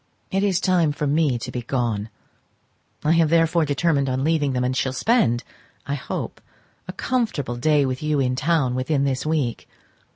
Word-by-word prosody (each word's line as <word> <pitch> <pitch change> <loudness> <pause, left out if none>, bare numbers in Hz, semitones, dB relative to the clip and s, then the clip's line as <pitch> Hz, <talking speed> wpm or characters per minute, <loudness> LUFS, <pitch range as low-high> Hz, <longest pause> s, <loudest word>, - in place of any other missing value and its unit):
It 195 - +1
is 195 -3 +2
time 175 -6 +2
for 150 - -3
me 145 -3 +2
to 125 +2 -6
be 125 - -4
gone; 115 -4 -2 0.9
I 150 - +2
have 165 -2 +4
therefore 165 0 +3
determined 145 -1 +1
on 130 +1 -1
leaving 150 -3 +1
them, 125 0 0
and 125 +1 0
shall 130 0 0
spend, 135 - +2 0.4
I 140 - -3
hope, 140 -3 -5 0.5
a - - -4
comfortable 215 - -2
day 145 +3 +2
with 130 -1 -3
you 150 -1 0
in 125 -1 +1
town 140 -2 +1
within 135 +3 0
this 135 +1 -1
week. 145 -7 -1
145 Hz, 175 wpm, -23 LUFS, 130-165 Hz, 0.9 s, have